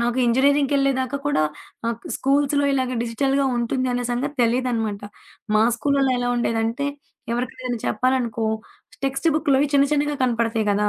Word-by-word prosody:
నాకు 240 +2 0
ఇంజినీరింగ్‌కెళ్ళేదాకా 275 +1 +2
కూడా 290 - +2 0.5
ఆ - - +2
క్ - - -44
స్కూల్సులో 285 +1 +2
ఇలాగ 260 -2 0
డిజిటల్‌గా 270 +4 0
ఉంటుంది 255 +2 -1
అనే 245 0 -1
సంగతి 275 +5 -2
తెలీదనమాట. 230 -4 0 0.5
మా 215 - +5
స్కూల్లళ్ళో 275 0 +1
ఎలా 245 0 -1
ఉండేదంటే 230 +3 0 0.5
ఎవరికి 240 +1 -2
ఏదైనా 245 -2 -3
చెప్పాలనుకో, 235 -1 0 0.6
టెక్స్ట్ 270 +5 0
బుక్కులోవి 285 -1 +2
చిన్న 280 0 +5
చిన్నగా 295 0 +1
కనపడతాయి 230 -3 +1
కదా! 210 +1 +2
255 Hz, 140 wpm, -22 LUFS, 235-275 Hz, 0.6 s, మా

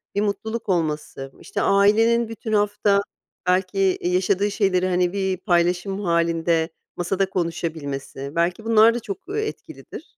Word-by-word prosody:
bir 205 - +1
mutluluk 215 +2 -3
olması, 150 -5 -2
işte, - - -4
ailenin 225 +4 +4
bütün 225 -1 -5
hafta 205 -1 +2 0.5
belki, 185 +2 +1
eee, 185 -2 +1
yaşadığı 195 +2 +1
şeyleri, 190 -3 +1
hani, 180 0 +1
bir 190 -2 -1
paylaşım 180 +2 0
hâlinde 170 -1 +1 0.3
masada 190 +2 0
konuşabilmesi, 150 -6 -4
belki 175 +6 0
bunlar 225 0 +6
da 240 - -2
çok, 200 -3 -6
eee, 435 +1 -1
etkilidir. - - -10
185 Hz, 135 wpm, -23 LUFS, 170-205 Hz, 0.5 s, bunlar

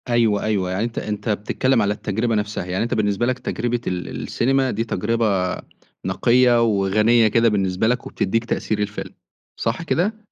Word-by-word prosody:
أيوه، 115 -4 +2
أيوه 100 -4 0
يعني 95 +4 -1
أنت 115 0 -4
أنت 105 +1 -3
بتتكلّم 115 +4 +1
على 105 0 +1
التجربة 110 +3 -1
نفْسها، 105 -3 -2
يعني 95 +3 -1
أنت 115 - -2
بالنسبة 105 +1 +1
لك 130 +1 -1
تجربة 120 -1 -2
ال 90 -1 -2 0.2
السينما، 135 +1 +1
دي 110 +3 -1
تجربة 105 -4 0 0.5
نقية 120 +5 +3
وغنية 110 +2 +3
كده 115 +2 +3
بالنسبة 95 0 0
لك، 125 +1 0
وبتدّيك 115 +4 -1
تأثير 110 -2 -2
الفيلم، 100 -2 -4 0.5
صح 115 +8 -1
كده؟ 210 +6 -2
110 Hz, 165 wpm, -21 LUFS, 100-120 Hz, 0.5 s, نقية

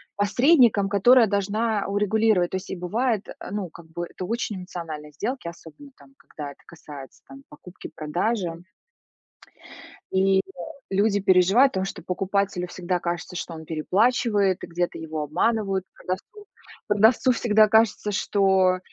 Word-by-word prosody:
посредником, 225 0 +4
которая 230 +4 +5
должна 205 +2 -1
урегулировать. 205 -2 +2
То - - -3
есть, 185 - -9
и - - -3
бывает, 215 +5 -1
э, - - -8 0.2
ну, 200 -3 -3
как 170 +1 -14
бы 175 +1 -6
это 185 - -7
очень 225 -1 -3
эмоциональные 165 -5 -7
сделки, 220 - -4
особенно 170 - -11
там, 275 - -20
когда 145 -2 -9
это - - -18
касается 145 -5 -12
там 135 0 -13
покупки-продажи. 175 +3 -4 1.5
И, 190 0 +3
э, - - -2 0.5
люди 200 +1 +2
переживают, 195 +7 +4
потому 190 0 -1
что - - -7
покупателю 185 0 -1
всегда 180 0 -2
кажется, 175 +1 -4
что 170 - -5
он 160 0 -9
переплачивает 200 +4 +1
и - - -6
где-то 175 +1 -3
его 160 -1 -5
обманывают. 195 +5 0
Продавцу 300 - -7 0.4
продавцу 220 +5 +4
всегда 220 -2 +3
кажется, 220 -1 +2
что 190 -2 +2
195 Hz, 140 wpm, -24 LUFS, 175-215 Hz, 1.5 s, которая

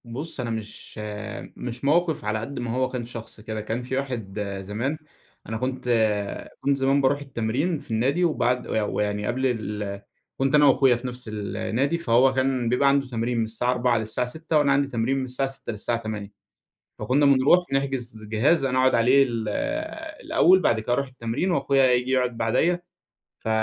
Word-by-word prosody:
بُصّ، 135 +7 -5
أنا 120 -2 -2
مش 110 -2 -7 0.6
مش 125 +2 -6
موقف 160 -3 +2
على 105 +1 0
قدّ 125 +5 -6
ما 120 -1 -3
هو 130 +2 0
كان 125 -2 -4
شخص 115 -2 -9
كده، 110 0 -5
كان 110 +3 -3
في 130 +1 -3
واحد 115 -7 -4 0.2
زمان 115 +10 -3 0.5
أنا 110 - -2
كنت 130 +1 -3 0.7
كنت 140 0 +2
زمان 135 +1 +2
باروح 135 +1 +2
التمرين 140 +5 -1
في 140 - -13
النادي، 135 +10 +1
وبعد 125 -6 0
وي 110 - 0
ويعني 105 0 -1
قبل 125 +2 -1
ال 105 -5 -2 0.4
كنت 135 +2 +2
أنا 150 0 +6
واخويا 135 -2 +5
في 120 +2 -5
نَفس 125 -1 -6
النادي، 115 +8 -1
فهو 130 -3 +3
كان 130 -2 0
بيبقى 125 +3 +3
عنده 140 -1 +2
تمرين 120 0 -2
من 115 - +2
الساعة 115 +3 -1
16:00 125 -1 +2
للساعة 110 +3 -2
18:00 160 +4 -1
وأنا 145 -2 +3
عندي 140 0 +3
تمرين 125 +1 0
من 135 - -1
الساعة 130 +1 -2
18:00 135 -1 -7
للساعة 115 +2 -2
20:00، 110 -3 -5 0.7
فكنا 145 +3 +2
بنروح 140 +6 +5
نحجز 130 -5 -2
جهاز 130 +8 +2
أنا 130 -1 +1
أقعد 130 0 +4
عليه 125 +4 +5
ال 115 -4 -3 0.8
الأول، 250 - +5
بعد 120 -10 +2
كده 115 +3 -1
أروح 140 +2 0
التمرين 130 +8 -2
واخويا 140 -5 +2
ييجي 125 +1 +1
يقعد 125 -2 +1
بعديَّ، 125 +11 +2 0.6
ف - - -6
125 Hz, 180 wpm, -25 LUFS, 115-140 Hz, 0.8 s, أنا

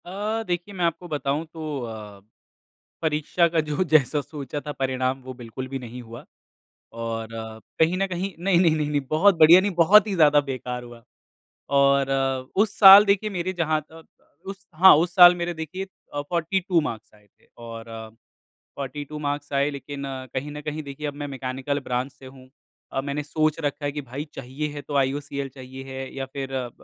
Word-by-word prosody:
अ, 210 +5 -3
देखिए 175 0 -4
मैं 180 -2 0
आपको 170 +1 -2
बताऊँ 150 0 -2
तो 155 -3 -5
अ, 105 -3 -9 0.8
परीक्षा 160 +2 +1
का 165 -1 0
जो 150 +3 -1
जैसा 150 -3 +3
सोचा 145 0 -6
था 150 - -6
परिणाम 130 -1 -2
वो 130 0 -7
बिल्कुल 125 +1 -8
भी 135 +1 -5
नहीं 125 0 -8
हुआ 115 0 -11 0.7
और 115 -1 -5
अ, 110 -1 -7 0.2
कहीं 165 +3 +3
न 195 +1 0
कहीं 185 +1 -4
नहीं-नहीं, 175 -3 +3
नहीं-नहीं 150 -1 0
बहुत 185 +6 +4
बढ़िया 165 +4 +8
नहीं, 205 +1 -1
बहुत 195 +6 +6
ही 200 - -2
ज़्यादा 150 -3 +5
बेकार 125 -1 -5
हुआ 120 -1 -13 0.8
और 140 0 +3 0.5
उस 210 +1 +2
साल 200 0 +11
देखिए 205 +1 +1
मेरे 185 -1 -2
जहाँ 160 -3 0
तक 160 0 -14 0.4
उस 195 0 -8
हाँ 185 +4 +8
उस 170 +3 0
साल 180 -1 +9
मेरे 175 0 -3
देखिए 160 +4 -5 0.3
अ, 145 - -1
फोर्टी 170 +5 -1
टू 175 -3 +4
मार्क्स 115 -8 -6
आए 105 -1 -23
थे - - -28
और 115 -1 -9 0.9
फोर्टी 140 +1 -5
टू 150 +2 -8
मार्क्स 145 0 -4
आए 140 +1 +2
लेकिन 140 0 -7 0.3
कहीं 135 +3 -3
न 150 - -7
कहीं 150 +1 -4
देखिए 140 +1 -7
अब 145 - -4
मैं - - -3
मैकेनिकल 135 +1 -3
ब्रांच 125 0 -3
से 135 - -15
हूँ। 130 0 -14 0.4
अ, - - 0
मैंने 140 +2 -3
सोच 155 +1 0
रखा 145 -1 -3
है 145 - 0
कि 145 - -4
भाई 135 +3 -6
चाहिए 135 +4 -5
है 145 -1 -7
तो 145 - -7
आईयूसीएल 140 0 -1
चाहिए 130 0 -10
है 130 0 -7
या 135 -1 -4
फिर 135 0 -6
अ, 125 -2 -3
145 Hz, 190 wpm, -24 LUFS, 130-170 Hz, 0.9 s, साल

